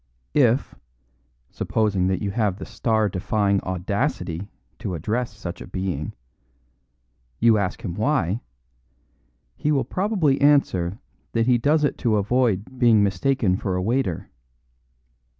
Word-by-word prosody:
If 130 -2 +3 0.8
(supposing 100 -4 0
that 95 0 -1
you 100 - -1
have 105 -3 0
the - - -7
star 110 -2 +1
defying 100 +1 0
audacity 95 - -2 0.3
to 90 - -3
address 115 +9 -2
such 100 -4 -7
a - - -8
being) 90 -6 -3 1.2
you 115 -2 +4
ask 100 +4 -3
him 90 -7 -3
why, 110 - 0 1.1
he 150 - 0
will 140 -3 +1
probably 185 -9 +1
answer 100 -11 +3 0.4
that 115 -1 +2
he 125 -1 +3
does 150 +5 +2
it 145 - 0
to 115 -4 +2
avoid 115 +2 0
being 115 -4 +5
mistaken 100 0 +1
for 95 -3 -2
a 90 - 0
waiter. 115 -5 -1
110 Hz, 130 wpm, -23 LUFS, 95-125 Hz, 1.2 s, being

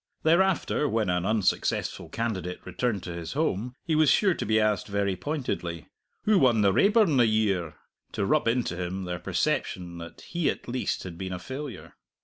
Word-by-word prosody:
Thereafter 170 -3 +2
when 110 -4 +1
an 90 +1 0
unsuccessful 110 -3 0
candidate 95 -6 -3
returned 115 -7 -2
to 90 - -5
his 85 -1 -6
home, 125 - -1
he 160 - 0
was 155 -2 +4
sure 190 +5 +4
to - - -4
be 110 +1 +3
asked 105 -1 +1
very 100 -2 0
pointedly, 90 - -4 0.3
"Who 210 -2 +4
won 120 -5 +4
the 100 -2 +4
Raeburn 200 - +4
the 120 -2 +5
year?" 100 -7 +1 0.4
to - - -1
rub 150 +2 +2
into 115 -6 +1
him 90 +2 -3
their 90 -1 -4
perception 85 -2 -2
that 85 0 -10
he 170 -4 -1
at - - -4
least 125 +1 -2
had 85 -3 -8
been 95 -1 -4
a - - -3
failure. 130 +8 -7
110 Hz, 180 wpm, -27 LUFS, 90-140 Hz, 0.4 s, the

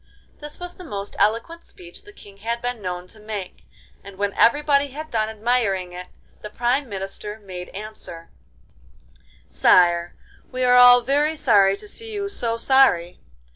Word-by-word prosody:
This 295 0 -10
was 355 0 -7
the 365 - -13
most 205 - -7
eloquent 230 +11 0
speech 175 -1 -12
the 410 - -13
King 200 - -15
had 230 +3 -3
been 245 -2 -4
known 180 -1 -5
to 215 +4 -14
make, 210 -3 -8 0.4
and 200 -1 -12
when 200 0 -1
everybody 285 +3 +3
had 305 +3 -9
done 220 -1 0
admiring 210 -5 -1
it 180 0 -8 0.3
the 210 - -8
Prime 245 +5 -1
Minister 200 +1 -6
made 185 -3 -9
answer: 195 -5 -10 1.2
'Sire, 175 -1 +3 0.4
we 255 0 -3
are 250 0 +4
all 245 0 +8
very 290 +5 0
sorry 200 -8 +4
to - - -11
see 450 +2 -3
you 405 -1 -3
so 230 - -3
sorry. 230 -9 +3
220 Hz, 160 wpm, -22 LUFS, 195-270 Hz, 1.2 s, all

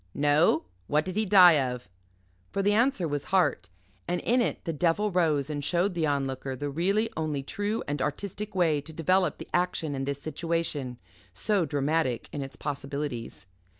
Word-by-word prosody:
No? 145 +3 +3 0.2
What 150 +1 +2
did 185 0 -5
he 215 0 0
die 180 -5 +8
of?" 125 -4 -4 0.6
For 195 - -1
the 205 +1 +3
answer 225 -5 +2
was 145 -1 -3
"Heart," 180 - +1 0.4
and 175 - 0
in 245 +2 +2
it 235 - -2
the 165 - -2
devil 175 +7 +1
rose 155 -6 +2
and 145 -1 -4
showed 180 +5 +1
the 165 -3 0
Onlooker 135 -2 -2
the 145 +2 -4
really 195 +9 +1
only 155 -3 -2
true 205 +9 -2
and 145 -1 -2
artistic 200 +8 -4
way 160 -5 +2
to 160 +3 -11
develop 180 +4 +2
the - - -9
action 175 -4 0
in 135 -1 -3
this 140 0 -3
situation, 155 -5 -3 0.4
so 200 - +1
dramatic 140 -3 0
in 145 - -4
its 135 0 -7
possibilities. 140 -3 -5
160 Hz, 175 wpm, -28 LUFS, 140-185 Hz, 0.6 s, die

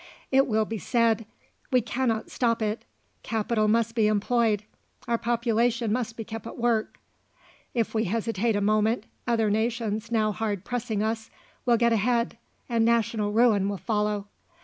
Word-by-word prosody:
It 270 +1 +4
will 220 -1 +2
be 220 0 -4
said: 230 -2 +1 0.4
"We 255 - +4
cannot 230 -1 -1
stop 230 -2 +1
it; 215 +1 -2 0.4
capital 220 -1 0
must 230 +1 +2
be 225 -3 +3
employed; 215 0 +2 0.4
our 235 -1 +1
population 235 -1 +1
must 235 -1 -2
be 225 - -4
kept 225 0 -7
at - - -8
work; 230 -2 0 0.8
if 230 -2 0
we 220 0 +1
hesitate 225 +2 0
a 205 - 0
moment, 215 +2 +2 0.2
other 225 -3 +2
nations 220 0 -1
now 215 -2 +2
hard 205 -3 -3
pressing 235 -4 -2
us 220 0 -2 0.4
will 240 -1 +5
get 235 0 +3
ahead, 235 +1 +1 0.3
and 230 -2 +1
national 225 -2 +1
ruin 215 -3 +3
will 200 - -3
follow." 210 -1 -1
225 Hz, 155 wpm, -26 LUFS, 215-235 Hz, 0.8 s, will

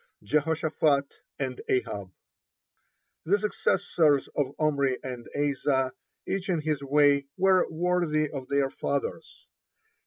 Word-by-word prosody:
(24) 155 +6 +2
JEHOSHAPHAT 150 -2 +1 0.3
AND 130 -2 -3
AHAB 100 -7 -1 1.1
The 195 +5 +3
successors 160 -8 +1
of 140 -1 -1
Omri 140 -4 +1
and 125 -3 -6
Asa, 135 -2 +1 0.3
each 195 0 -3
in 170 -4 +1
his 150 -2 -1
way, 140 0 +3
were 190 -1 +4
worthy 165 -2 +1
of 135 -3 -7
their 140 -1 +1
fathers. 140 -1 -4
145 Hz, 115 wpm, -27 LUFS, 135-160 Hz, 1.1 s, were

